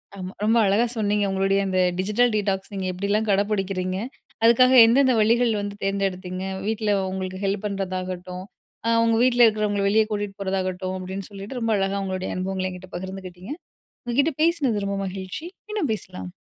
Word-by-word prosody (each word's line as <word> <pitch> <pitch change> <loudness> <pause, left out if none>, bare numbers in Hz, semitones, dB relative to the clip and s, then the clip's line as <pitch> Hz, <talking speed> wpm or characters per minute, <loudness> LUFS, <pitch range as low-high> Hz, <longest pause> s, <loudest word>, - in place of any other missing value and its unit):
அ - - -12
ஆமா 185 +1 -6
ரொம்ப 225 +2 +4
அழகா 210 +5 +3
சொன்னீங்க. 205 -1 +1
உங்களுடைய 195 +1 +2
இந்த 185 0 +1 0.2
டிஜிட்டல் 215 +5 +2
டீடாக்ஸ் 195 -1 -1
நீங்க 190 -1 -2
எப்டிலாம் 200 +4 0
கடை 200 +1 +3
பிடிக்கிறீங்க, 185 -2 -1 0.5
அதுக்காக 255 +2 +6
எந்தெந்த 260 +3 +4
வழிகள் 230 +2 +3
வந்து 205 0 -5
தேர்ந்தெடுத்தீங்க, 190 -2 -2 0.2
வீட்ல 220 -1 0 0.2
உங்களுக்கு 185 0 -4
ஹெல்ப் 200 +1 -1
பண்றதாகட்டும், 185 -1 -4 0.4
அ - - +3
உங்க 230 0 +3
வீட்ல 245 -1 +5
இருக்குறவங்கள 210 -2 +1
வெளியே 220 +2 +4
கூட்டிட்டு 205 -1 -3
போறதாகட்டும், 185 -1 -2
அப்டின்னு 190 +1 -6
சொல்லிட்டு 200 +6 -7
ரொம்ப 225 -1 0
அழகா 195 +1 0
உங்களுடைய 185 -1 -3
அனுபவங்கள 185 0 -2
என்கிட்ட 180 0 -10
பகிர்ந்துகிட்டிங்க. 185 +3 -7 0.5
உங்க 240 0 -3
கிட்ட 315 +3 +2
பேசினது 270 -12 +1
ரொம்ப 200 0 -2
மகிழ்ச்சி 190 - -6 0.2
மீண்டும் 415 - -1
பேசலாம். 95 - -8
195 Hz, 160 wpm, -24 LUFS, 185-220 Hz, 0.5 s, அதுக்காக